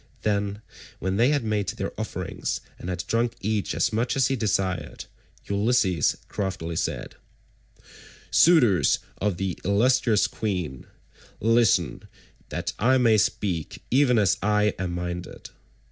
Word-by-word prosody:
Then, 100 0 -1 0.3
when 95 +1 -2
they 120 +4 +4
had 145 -4 +1
made 105 -2 -1
their - - -4
offerings - - -4 0.2
and 90 - -6
had 90 0 -3
drunk 115 +2 0
each 105 0 -1
as - - +1
much 115 +3 0
as 135 -1 +2
he 135 - +1
desired, 95 -5 -2 0.4
Ulysses 100 - +1
craftily 85 -4 -4
said:— - - -3 1.1
"Suitors 130 - +5 0.2
of 100 -3 0
the 95 -1 -3
illustrious 110 +2 +3
queen, 90 - -4 0.5
listen 115 -1 +2 0.4
that - - -3
I 130 +5 +4
may 115 -4 +4
speak 90 -7 -2
even 125 -1 +4
as 100 -5 +3
I 105 0 +2
am 90 -2 -2
minded. 90 0 -6
105 Hz, 130 wpm, -25 LUFS, 95-115 Hz, 1.1 s, Suitors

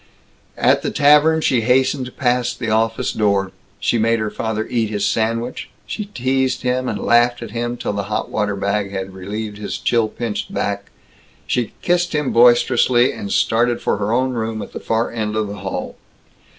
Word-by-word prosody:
At - - +3
the - - -2
Tavern 150 +2 +4
she 125 -6 +2
hastened 130 +2 +1
past 125 -1 0
the 115 -3 -3
office 110 +1 +1
door. 100 -3 +1 0.3
She 120 - +1
made 115 +1 +2
her 110 -1 -2
father 110 -1 -2
eat 115 -3 0
his 105 -1 -1
sandwich; 115 +4 -1 0.2
she 210 - -4
teased 130 -9 -1
him 125 0 0
and - - -2
laughed 120 +1 +2
at - - -8
him 120 +1 -3
till 115 - -3
the 100 -1 -3
hot 105 - -2
water 105 -2 -1
bag 100 0 -1
had 95 -1 -5
relieved 105 +3 -6
his 105 - -4
chill 115 -2 +1
pinched 115 -1 -4
back; - - -3 0.6
she 120 -3 -1
kissed 175 -1 +1
him 150 -2 0
boisterously, 120 +1 +4
and 100 - -6
started 120 +1 +2
for - - 0
her 100 +1 -2
own 130 +2 +1
room, 110 -2 -3
at - - -10
the - - -5
far 115 +1 -1
end 110 -2 -3
of 110 0 0
the 100 +1 -7
hall. 95 -1 -5
115 Hz, 185 wpm, -19 LUFS, 105-125 Hz, 0.6 s, Tavern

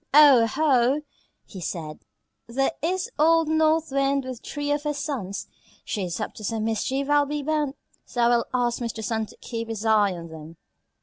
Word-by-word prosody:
"Oh, 280 -6 +8
ho!" 270 +1 +2 0.4
he 190 - -10
said, 155 -2 -5 0.5
"there 270 +5 0
is 365 +3 -1
old 325 +1 +4
North 315 0 +2
Wind 275 0 +1
with 255 -2 -7
three 290 0 -3
of 290 0 +1
her 295 0 -2
sons. 255 - -4 0.4
She 200 -3 -2
is 175 +2 -4
up 215 - -4
to 215 - -9
some 220 +1 -2
mischief, 260 +5 -1
I'll 290 0 +3
be 295 0 -3
bound; 300 -2 0 0.3
so 245 - -3
I 235 - +5
will 240 -1 +3
ask 245 -2 0
Mr. 230 -2 -4
Sun 220 0 -1
to - - -16
keep 230 -1 -5
his 225 -1 -4
eye 210 -3 +4
on 170 -1 -8
them." 160 +1 -11
255 Hz, 190 wpm, -25 LUFS, 220-290 Hz, 0.5 s, Oh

